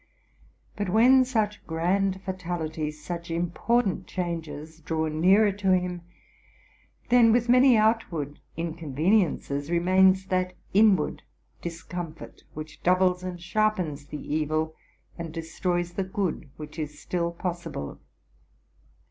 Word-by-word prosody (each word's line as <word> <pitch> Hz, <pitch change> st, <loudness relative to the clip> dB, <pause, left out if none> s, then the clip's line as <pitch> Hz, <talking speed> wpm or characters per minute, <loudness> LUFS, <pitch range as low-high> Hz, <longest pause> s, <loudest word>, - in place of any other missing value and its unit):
But 205 Hz, -2 st, -2 dB
when 250 Hz, +6 st, +6 dB
such 215 Hz, -4 st, -1 dB
grand 190 Hz, +4 st, 0 dB
fatalities, 160 Hz, -5 st, -4 dB
such 170 Hz, +1 st, -5 dB
important 185 Hz, +5 st, 0 dB
changes, 160 Hz, -3 st, -5 dB
draw 160 Hz, 0 st, -1 dB
nearer 190 Hz, +7 st, +4 dB
to 195 Hz, -1 st, +1 dB
him, 180 Hz, -1 st, -2 dB, 1.1 s
'then 240 Hz, -2 st, +6 dB
with 240 Hz, +1 st, +2 dB
many 250 Hz, -1 st, +6 dB
out 220 Hz, -1 st, +2 dB
ward 145 Hz, -3 st, -4 dB, 0.2 s
inconveniences 160 Hz, -2 st, 0 dB
remains 185 Hz, +2 st, +4 dB
that 185 Hz, -1 st, 0 dB, 0.2 s
inward 205 Hz, -1 st, +4 dB, 0.4 s
discomfort, 170 Hz, -1 st, -7 dB
which 155 Hz, 0 st, -8 dB
doubles 180 Hz, 0 st, +3 dB
and 180 Hz, -1 st, -5 dB
sharpens 175 Hz, -6 st, -1 dB
the 150 Hz, -, -6 dB
evil, 155 Hz, +1 st, -1 dB, 0.5 s
and 165 Hz, -1 st, -5 dB
destroys 175 Hz, +2 st, -2 dB
the 195 Hz, -, -1 dB
good 185 Hz, -5 st, -3 dB
which 150 Hz, +1 st, -8 dB
is 150 Hz, -1 st, -5 dB
still 170 Hz, -1 st, -2 dB
possible. 170 Hz, -, -5 dB
175 Hz, 115 wpm, -26 LUFS, 160-195 Hz, 1.1 s, when